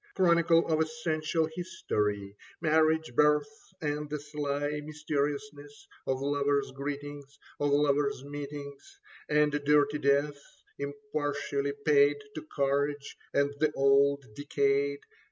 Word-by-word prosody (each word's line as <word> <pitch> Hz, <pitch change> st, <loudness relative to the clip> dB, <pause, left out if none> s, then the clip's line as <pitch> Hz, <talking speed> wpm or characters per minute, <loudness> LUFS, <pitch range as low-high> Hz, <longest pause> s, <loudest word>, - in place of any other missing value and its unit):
Chronicle 170 Hz, -2 st, +4 dB
of 160 Hz, -1 st, +2 dB
essential 160 Hz, 0 st, 0 dB
history: 105 Hz, -, -2 dB, 0.2 s
Marriage, 160 Hz, -2 st, +2 dB
birth, 150 Hz, -, +1 dB
and 150 Hz, -1 st, -2 dB
the 150 Hz, 0 st, -3 dB
sly 145 Hz, 0 st, -3 dB
mysteriousness 145 Hz, -1 st, -4 dB, 0.2 s
Of 135 Hz, 0 st, -1 dB
lovers' 140 Hz, 0 st, +1 dB
greetings, 145 Hz, +1 st, -6 dB, 0.2 s
of 145 Hz, -, +1 dB
lovers' 140 Hz, -1 st, +2 dB
meetings. 145 Hz, -, -8 dB, 0.3 s
And 150 Hz, 0 st, +3 dB
dirty 145 Hz, 0 st, +3 dB
death, 140 Hz, +1 st, +1 dB, 0.4 s
impartially 145 Hz, -4 st, -2 dB
paid 145 Hz, -1 st, +5 dB, 0.2 s
To 155 Hz, -, -5 dB
courage 140 Hz, -1 st, -1 dB, 0.2 s
and 140 Hz, 0 st, +1 dB
the 155 Hz, -1 st, +2 dB
old 140 Hz, 0 st, +3 dB
decayed. 140 Hz, +1 st, 0 dB
145 Hz, 105 wpm, -30 LUFS, 140-150 Hz, 0.4 s, paid